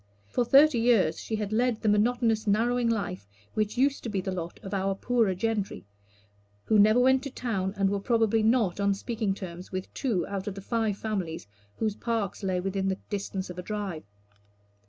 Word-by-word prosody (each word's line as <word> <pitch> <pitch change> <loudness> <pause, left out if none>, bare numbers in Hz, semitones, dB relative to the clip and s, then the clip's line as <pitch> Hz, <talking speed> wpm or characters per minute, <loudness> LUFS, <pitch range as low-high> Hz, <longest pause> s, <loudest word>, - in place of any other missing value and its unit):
For 245 - 0
thirty 275 +1 +6
years 225 -9 +3
she 220 - -3
had 210 -1 -3
led 240 0 +1
the - - +1
monotonous, 220 +1 +2
narrowing 235 +3 +2
life 105 - -2 0.3
which 215 +2 -1
used 275 +2 +2
to 235 - -5
be 200 -2 -1
the 190 +1 -3
lot 175 -2 -5
of 195 - -6
our 195 0 0
poorer 225 -3 +1
gentry; 205 - -2 0.8
who 215 - +4
never 215 +4 +6
went 260 +1 +4
to 280 - -5
town, 205 -7 -2
and 195 -1 +2
were 200 +1 0
probably 225 +1 +2
not 220 -4 +2
on 200 0 +2
speaking 215 -1 -2
terms 180 -2 -8
with 185 0 -5
two 215 - -1
out 200 -1 -5
of 200 - -3
the - - -6
five 220 -1 -1
families 190 - -3 0.3
whose 215 -2 -1
parks 225 -5 -2
lay 185 -2 0
within 195 +1 -1
the 190 0 0
distance 195 -2 -3
of 180 - -8
a - - -2
drive. 200 -4 -4
210 Hz, 195 wpm, -28 LUFS, 190-230 Hz, 0.8 s, thirty